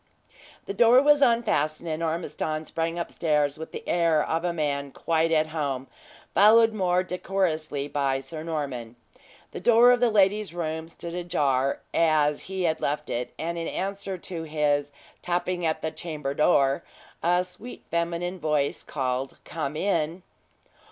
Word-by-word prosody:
The - - -4
door 235 +4 +6
was 290 +1 +5
unfastened, 190 - +2
and 160 0 -3
Ormiston 160 -1 -2
sprang 165 +1 -2
upstairs 150 -4 0
with 160 - -7
the - - -8
air 165 -3 +3
of 165 +1 -1
a 175 - 0
man 145 -4 -2
quite 165 +3 0
at 155 -1 +2
home, 140 -5 -2 0.5
followed 225 +2 +6
more 185 -3 +1
decorously 170 -6 -2
by 140 -2 0
Sir 145 +4 -8
Norman. 140 -8 -4 0.6
The - - -6
door 235 +4 +6
of 245 - +3
the 245 -1 +3
lady's 205 -2 +2
room 160 -1 -3
stood 170 0 -7
ajar, 145 -7 0
as 155 -3 +3
he 190 -1 -4
had 160 -2 0
left 145 +1 -2
it, 120 +1 -3
and 170 +1 -3
in 165 - -3
answer 195 0 -3
to 170 -1 -5
his 150 -2 0 0.3
"tapping 175 0 -1
at 160 - -2
the 160 - -1
chamber 150 -5 -4
door," 140 -1 +3 0.4
a 175 +2 +3
sweet 185 +7 -10
feminine 170 +2 -2
voice 150 -3 0
called 130 -1 -3
"come 155 -3 -4
in." 170 -1 -1
165 Hz, 150 wpm, -26 LUFS, 150-180 Hz, 0.6 s, door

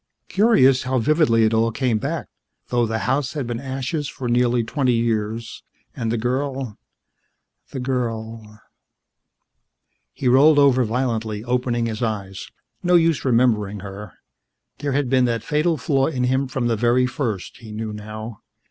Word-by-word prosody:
Curious 160 - +4
how 130 0 -1
vividly 130 -3 +3
it 110 0 +2
all 115 +1 +2
came 120 -2 0
back, - - -3 0.4
though 120 -1 +1
the 110 0 -1
house 135 +1 0
had 145 -4 -3
been 120 -1 -4
ashes 135 +3 -3
for 130 - -6
nearly 120 0 +2
twenty 125 +2 0
years, 115 -1 -2 0.3
and 115 -2 -2
the 120 - 0
girl 130 0 -2 0.9
the 130 - -6
girl... 115 -4 -4 1.5
He 125 - -3
rolled 140 +5 +6
over 135 -3 +5
violently, 110 -3 -2
opening 120 -1 0
his 110 0 -4
eyes. 100 -4 -4 0.3
No 180 0 +3
use 165 -5 +3
remembering 110 -5 +1
her. 100 0 -9 0.7
There 145 -1 -2
had 140 0 +1
been 130 0 +3
that 115 -1 -1
fatal 160 +2 +1
flaw 135 0 +1
in 130 -5 -2
him 130 +2 +1
from 130 -1 -2
the 115 -1 +1
very 120 +3 +2
first, 120 -7 -3
he 115 -4 -11
knew 110 0 -5
now. 110 +1 -8
120 Hz, 155 wpm, -22 LUFS, 110-135 Hz, 1.5 s, rolled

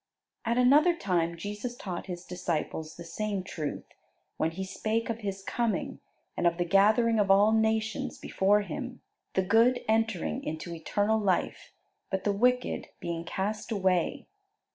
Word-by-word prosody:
At 235 +1 +1
another 290 +8 +5
time 170 - 0
Jesus 205 +7 -5
taught 185 -6 -6
His 180 -1 -6
disciples 165 -3 -3
the 170 - -9
same 195 +3 -3
truth; 155 -5 -4 0.5
when 160 - +1
He 180 +4 -5
spake 220 +4 -1
of 230 - -5
His 195 -2 -4
coming 235 +1 -1 0.4
and 175 - +2
of 170 0 +1
the 175 - 0
gathering 215 +5 +4
of 200 -1 +2
all 200 +2 +6
nations 220 -1 0
before 205 +2 +2
Him, 250 +4 -6 0.3
the 190 - +3
good 230 +6 +4
entering 220 - 0
into 160 +2 -5
eternal 205 +6 0
life, 195 -4 -1 0.4
but 190 -1 -2
the 205 - +1
wicked 250 +4 +1
being 170 -1 -3
cast 205 +6 -3
away. 185 -4 +1
200 Hz, 150 wpm, -29 LUFS, 175-225 Hz, 0.5 s, all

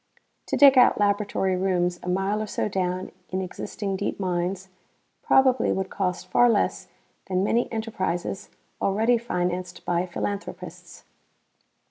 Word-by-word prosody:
To - - -1
dig 275 -2 +8
out 250 - +5
laboratory 200 -2 +1
rooms 180 -1 0
a 180 - -5
mile 195 +3 0
or 215 - -3
so - - -2
down 185 -2 -2 0.2
in 185 - -2
existing 195 +1 -4
deep 200 - -3
mines 185 0 -2 0.5
probably 260 -1 +3
would 190 0 -2
cost 180 -2 -2
far 245 +5 +5
less 220 - 0 0.4
than 185 0 0
many 235 +4 +1
enterprises 195 -5 -3 0.3
already 225 +5 +2
financed 180 -5 -3
by 175 +1 0
philanthropists. 200 +3 -6
190 Hz, 130 wpm, -25 LUFS, 180-215 Hz, 0.5 s, dig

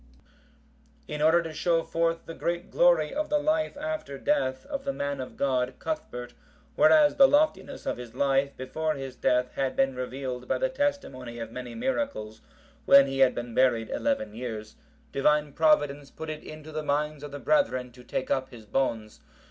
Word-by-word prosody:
] - - -33
In 150 - -4
order 165 +2 +5
to 165 -1 -6
show 165 +1 +1
forth 165 0 -1
the 165 - -7
great 170 +2 -3
glory - - +4
of 305 +1 -2
the 300 - +3
life 310 0 0
after 305 - -4
death 130 - 0
of 280 -1 -5
the 275 - -1
man 140 - -3
of 130 - -8
God, 130 -2 0
Cuthbert, 125 - -5 0.4
whereas 305 -2 +5
the 275 - +9
loftiness 290 -1 +1
of - - -2
his 120 -2 -9
life 140 0 +1
before 155 +4 -2
his 135 -2 -6
death 125 0 +1
had 135 -1 -2
been 135 0 +2
revealed 125 0 -5
by - - +1
the - - 0
testimony 280 - -2
of 115 -1 -6
many 125 0 -7
miracles, 230 - -3 0.4
when 140 0 +8
he 135 0 -3
had 130 -1 +5
been 120 -1 -5
buried 120 -3 +2
eleven 280 -1 -1
years, 110 -3 -6 0.4
Divine 150 +1 +2
Providence 145 -3 +2
put 160 0 -6
it 155 - -7
into 155 0 -10
the 155 0 -3
minds 150 0 -1
of 145 - -7
the 145 - -7
brethren 130 -3 +1
to 125 +1 -15
take 130 +1 -3
up 130 0 0
his 115 -3 -12
bones. 110 - -2
140 Hz, 185 wpm, -27 LUFS, 125-170 Hz, 0.4 s, the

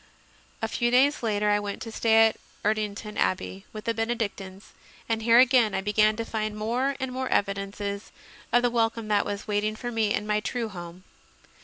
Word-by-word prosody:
A - - +2
few 240 -1 0
days 270 +4 +3
later 210 -2 +1
I 205 - +3
went 205 -1 -5
to 225 - -7
stay 225 0 +5
at 220 - -4 0.3
Erdington 210 0 -2
Abbey, 190 +1 -1
with 215 -1 -8
the 230 - +1
Benedictines, 210 -4 -4 0.4
and 225 -1 -1
here 230 +1 +5
again 245 -5 +5
I 190 - 0
began 215 +1 +3
to 230 +1 -4
find 215 -1 -3
more 245 +6 0
and 265 -1 -3
more 260 0 -3
evidences 200 +1 -2 0.4
of 245 +1 +4
the 245 - +2
wel 230 -1 +3
come 225 -1 -8
that 205 -1 +2
was 205 0 -5
waiting 210 +1 0
for 240 +2 -5
me 220 -3 0
in 210 - 0
my 210 0 +1
true 230 +1 -3
home. 175 -1 -9
215 Hz, 195 wpm, -26 LUFS, 205-230 Hz, 0.4 s, stay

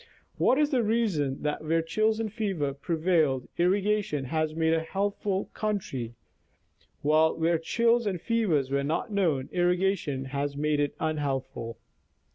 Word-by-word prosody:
What 260 - +4
is 300 0 +2
the 255 -3 +3
reason 205 - 0
that 150 +1 -2
where 165 +1 +1
chills 215 +6 +1
and 220 -2 -3
fever 190 -11 -1
pre 140 +5 -3
vailed, 155 -6 +2
irrigation 190 -5 +1
has 155 +2 -1
made 160 0 +2
a 165 - +3
healthful 195 +2 -2
country, 135 - -3 0.9
while 155 +2 +3
where 165 0 +2
chills 230 +6 +2
and 185 -3 -1
fevers 170 - +1
were 140 0 +1
not 165 - -2
known, 160 -10 +1
irrigation 175 -6 +1
has 140 0 -2
made 150 0 +1
it 145 -1 0
unhealthful 135 -6 -2
165 Hz, 145 wpm, -28 LUFS, 145-205 Hz, 0.9 s, What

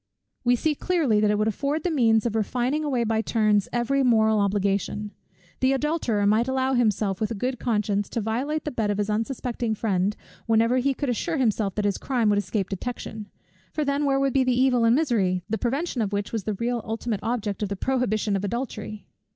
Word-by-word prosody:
We 245 0 +4
see 305 +5 0
clearly 295 -9 +1
that 210 0 +3
it 210 - +2
would 215 +1 +1
afford 285 +8 -1
the 360 - 0
means 225 -7 +3
of 230 -2 -1
refining 250 +7 0
away 260 -5 0
by 220 -1 +1
turns 215 -3 +1
every 245 +3 +1
moral 220 -4 +4
obligation. 200 +1 0 0.5
The 260 +1 +3
adulterer 270 -7 0
might 215 +4 +3
allow 265 0 0
himself 210 -5 +1
with 215 - 0
a 230 - -3
good 250 +4 -2
conscience, 210 -3 0
to - - -2
violate 255 +8 -2
the 300 - -2
bed 225 -5 -1
of 205 - 0
his 205 0 -1
unsuspecting 230 0 -2
friend, 200 -2 0 0.3
whenever 230 +2 +3
he 270 +1 +1
could 285 0 -2
assure 315 +7 -1
himself 215 -6 0
that 210 - -1
his 200 -2 0
crime 245 -5 +1
would 205 0 +3
escape 205 -2 -2
detection; 215 0 -5 0.5
for 305 - -1
then, 280 +1 0
where 270 -1 +2
would 275 -2 +1
be 270 - +3
the 255 -1 +1
evil 250 -3 +3
and 230 +1 +5
misery, 205 - +1
the 220 0 -2
prevention 265 - -1
of 205 -2 -1
which 205 0 -2
was 220 -4 -2
the 215 - -1
real 235 +3 -1
ultimate 225 -1 -3
object 220 -3 -2
of 205 - -1
the 200 - -2
prohibition 215 -3 0
of 195 - -2
adultery? 215 -1 -4
230 Hz, 210 wpm, -25 LUFS, 210-260 Hz, 0.5 s, and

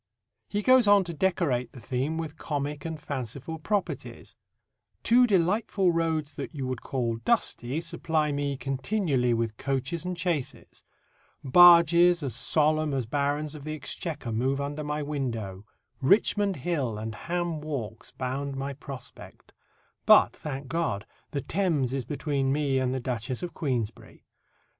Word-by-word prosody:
He 205 0 -1
goes 255 -2 +6
on 205 -1 +6
to 170 -2 -6
decorate 165 -8 0
the 125 - -10
theme 135 +7 -2
with 160 -2 -4
comic 145 0 -3
and 160 -2 -4
fanciful 140 +2 -5
properties: 205 +5 -3 0.7
Two 245 +1 +5
delightful 195 0 +2
roads 160 -3 -1
that - - -6
you 135 -2 -3
would 130 -2 -3
call 120 -4 -2
dusty 145 - 0
supply 160 -2 -1
me 140 -1 -2
continually 135 - 0
with 115 -2 -2
coaches 135 +4 -2
and 180 -1 -4
chaises; 170 -6 -3 0.6
barges 170 +2 +7
as 135 -5 -2
solemn 155 +3 +2
as 130 -3 -1
barons 145 +4 -1
of 150 -2 -9
the 155 +1 -4
exchequer 150 -4 -4
move 130 +5 0
under 145 +2 -3
my 150 0 -2
window; 115 -9 -4 0.3
Richmond 200 +5 +3
Hill 135 -7 -2
and 110 +1 -5
Ham 170 +4 -3
walks 125 -8 -5
bound 135 +2 -4
my 140 +1 -3
prospect; 135 -2 -10 0.5
but, - - +7
thank 140 -2 -6
God, 130 -10 -1 0.2
the 140 - -3
Thames 160 -10 0
is 135 -3 -2
between 140 -2 -1
me 140 -2 +1
and 130 -1 0
the 130 - -1
Duchess 125 - -3
of 175 - -4
Queensberry. 125 - -4
145 Hz, 145 wpm, -27 LUFS, 130-170 Hz, 0.7 s, barges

